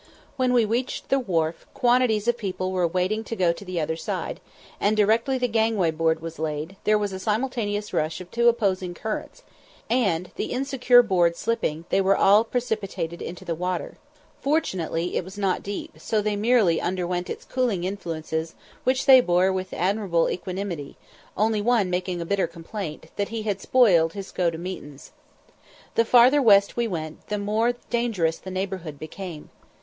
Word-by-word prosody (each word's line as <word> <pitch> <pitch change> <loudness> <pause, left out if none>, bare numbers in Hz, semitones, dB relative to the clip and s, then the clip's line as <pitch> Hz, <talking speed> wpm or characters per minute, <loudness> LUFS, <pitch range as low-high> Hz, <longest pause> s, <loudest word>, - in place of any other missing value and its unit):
When 255 -2 +1
we 240 -3 +4
reached 240 +4 -2
the 270 - +3
wharf, 165 -8 -1
quantities 240 -3 +2
of 240 - +3
people 185 -4 -3
were 180 -2 +1
waiting 185 +6 -1
to 230 - -4
go 180 -4 +2
to 170 - -10
the 185 -3 -3
other 160 0 -1
side; 165 - -4 0.4
and 215 +1 +2
directly 225 +5 +3
the 250 -1 0
gangway 220 -6 +1
board 160 0 0
was 165 -1 -7
laid, 155 +3 -3
there 215 0 +4
was 205 -2 -2
a 190 - -5
simultaneous 210 -1 -2
rush 155 +1 -1
of 180 -1 -11
two 235 0 +2
opposing 190 -6 0
currents, 220 +4 -5 0.5
and, 190 -8 +1
the - - -2
insecure 250 -2 +4
board 175 -6 +2
slipping, 170 -7 -2
they 195 - +3
were 195 +1 +3
all 205 +3 +6
precipitated 200 -8 -3
into 175 - -7
the 170 - -1
water. 180 +1 -3 0.4
Fortunately 180 - -1
it - - -1
was 190 +3 -11
not 195 -2 0
deep, 300 +11 -5
so 220 - 0
they 210 0 0
merely 210 -6 +3
underwent 180 0 -2
its - - -6
cooling 240 -9 -1
influences, 165 -4 -4 0.3
which 260 +1 +1
they 260 -2 +9
bore 185 -2 +2
with 185 0 -3
admirable 185 -2 +1
equanimity, 180 -5 -5 0.4
only 215 +1 +2
one 215 -4 +2
making 180 0 -2
a 170 - -3
bitter 195 0 +1
complaint, 165 -1 -7
that 200 -1 -1
he 225 -1 -4
had 205 -3 -2
spoiled 180 -11 +4
his 195 -2 -7
"go 175 -2 +1
to 165 - -6
meetins." 165 -5 -8 0.8
The 230 - +3
farther 250 +5 +6
west 200 -5 +5
we 235 -1 0
went, 155 -5 -6
the 210 - -2
more 215 +4 +1 0.2
dangerous 220 -9 0
the 190 - -9
neighbourhood 185 -5 -4
became. 160 +1 -8
195 Hz, 175 wpm, -25 LUFS, 170-225 Hz, 0.8 s, they